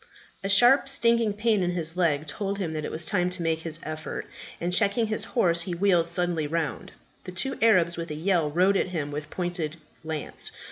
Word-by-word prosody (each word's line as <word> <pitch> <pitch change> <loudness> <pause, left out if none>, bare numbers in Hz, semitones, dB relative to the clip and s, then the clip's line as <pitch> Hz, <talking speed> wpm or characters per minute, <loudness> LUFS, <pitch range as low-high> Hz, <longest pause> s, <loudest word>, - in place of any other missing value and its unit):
A 195 - -2
sharp 245 +7 +6
stinging 230 -4 +3
pain 210 0 +1
in 175 - +1
his 165 -1 -2
leg 155 -5 +1
told 195 +6 -3
him 175 -5 -3
that 155 -1 -3
it - - -3
was 160 0 -2
time 180 -4 +1
to 180 -1 -4
make 165 -1 0
his 160 -1 -3
effort; 155 0 -5 0.3
and 175 +1 -2
checking 205 +4 +2
his 215 0 -2
horse, 170 -6 +3
he 180 -3 -4
wheeled 175 -2 +2
suddenly 170 -3 0
round. 160 0 -3 0.3
The 185 - -6
two 225 +9 -3
Arabs 180 -7 +4
with 170 0 -5
a 150 - -4
yell 165 -1 +1
rode 185 +6 +3
at - - 0
him 155 -5 -4
with 150 +1 -5
pointed 175 -3 -3 0.3
lance. 155 -2 -3
175 Hz, 205 wpm, -26 LUFS, 160-200 Hz, 0.3 s, sharp